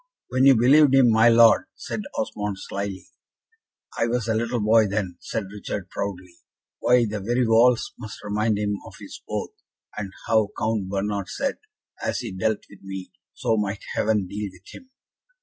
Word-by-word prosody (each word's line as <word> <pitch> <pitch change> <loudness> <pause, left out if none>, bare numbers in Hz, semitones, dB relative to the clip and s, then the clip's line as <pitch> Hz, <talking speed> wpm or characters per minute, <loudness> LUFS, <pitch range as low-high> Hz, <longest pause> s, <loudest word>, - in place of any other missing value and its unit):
"When 130 +1 +2
you 135 -1 +8
believed 135 +4 +5
him, 130 -3 +6
my 110 +1 +6
Lord," 115 0 +6
said - - -5 0.2
Osmond, 105 -2 -3
slyly. 100 -1 -5 0.9
"I 115 - +2
was 120 -1 -1
a 110 - +1
little 115 +2 -1
boy 110 +1 +4
then," 95 -3 -3
said 110 - -3
Richard, 100 -2 -6
proudly. 90 -3 -5 0.4
"Why, 125 -1 +4
the 105 -1 -3
very 120 +5 0
walls 115 +2 +4
must 110 -3 -9
remind 105 +1 0
him 105 -1 -1
of - - -12
his - - -10
oath, - - -3 0.4
and 100 -2 -5
how 110 -2 +2
Count 110 -3 -1
Bernard 100 0 -2
said, 275 - -2 0.4
as - - -1
he 115 -4 -5
dealt 105 +3 -1
with 100 - -16
me, 95 -1 -7 0.2
so 110 - 0
might 105 -1 -2
Heaven 105 -2 +1
deal 105 +2 -5
with 90 0 -19
him." 260 - -13
105 Hz, 170 wpm, -24 LUFS, 100-115 Hz, 0.9 s, you